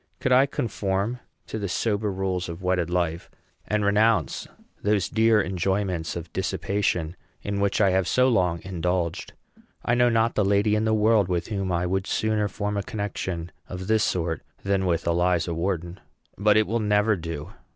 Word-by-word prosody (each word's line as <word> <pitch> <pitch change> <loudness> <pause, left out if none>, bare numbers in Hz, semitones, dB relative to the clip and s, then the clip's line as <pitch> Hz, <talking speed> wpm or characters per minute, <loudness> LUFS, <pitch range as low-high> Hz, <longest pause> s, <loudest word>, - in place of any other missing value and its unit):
Could 130 - 0
I 130 +2 +6
conform 105 -1 -2 0.3
to 110 - -5
the 100 -2 -3
sober 105 +1 0
rules 95 -2 -2
of 85 +3 -7
wedded 90 -2 +1
life, 85 -1 -1 0.4
and 105 -1 0
renounce 105 +2 +2 0.3
those 105 -3 +1
dear 110 0 +3
enjoyments 95 -2 -1
of 85 -1 -7
dissipation 90 -4 -1 0.3
in 100 0 -2
which 100 0 +1
I 100 -3 +4
have 95 -1 +1
so 125 +6 +3
long 90 -9 +1
indulged, 90 -2 -2 0.5
I 120 - +2
know 120 0 +4
not 115 0 +2
the 105 - +2
lady 100 +2 +2
in 110 +1 +1
the 110 - +2
world 110 -2 +3
with 90 +1 -2
whom 100 -3 -2
I 85 0 0
would 95 +2 -1
sooner 110 -1 +1
form 105 +1 -3
a - - +1
connection 95 -5 -4 0.2
of 90 0 -6
this 110 +1 +2
sort 85 -3 -1 0.2
than 95 -1 +1
with 85 -2 0
Eliza 85 0 +1
Wharton. 85 +1 -2 0.4
But 105 +1 +3
it 110 - +4
will 115 +3 -1
never 105 0 +2
do. 80 -4 -6
95 Hz, 175 wpm, -25 LUFS, 90-105 Hz, 0.5 s, I